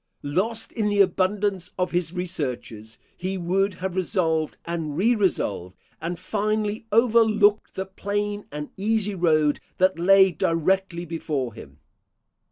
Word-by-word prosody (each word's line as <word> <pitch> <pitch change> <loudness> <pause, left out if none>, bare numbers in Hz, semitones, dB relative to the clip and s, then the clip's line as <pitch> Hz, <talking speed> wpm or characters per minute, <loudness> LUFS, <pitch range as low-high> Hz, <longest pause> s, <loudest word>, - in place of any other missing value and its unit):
Lost 210 +10 -1
in 215 -3 -1
the 205 0 0
abundance 190 0 +1
of 180 -1 0
his 175 -2 0
researches, 125 - -5 0.2
he 190 +2 -3
would 190 +2 0
have 185 +1 -4
resolved 165 -4 0
and 160 -3 -3
re 225 +7 +4
resolved, 105 - -1 0.3
and 170 +1 -3
finally 215 +3 -2
overlooked 220 -2 +3
the 190 - -3
plain 205 +2 -3
and 150 0 -6
easy 210 0 0
road 155 -5 +2 0.2
that 185 -1 +2
lay 190 +2 +6
directly 175 +2 0
before 150 -7 -3
him. 70 - -12
185 Hz, 130 wpm, -24 LUFS, 165-205 Hz, 0.3 s, lay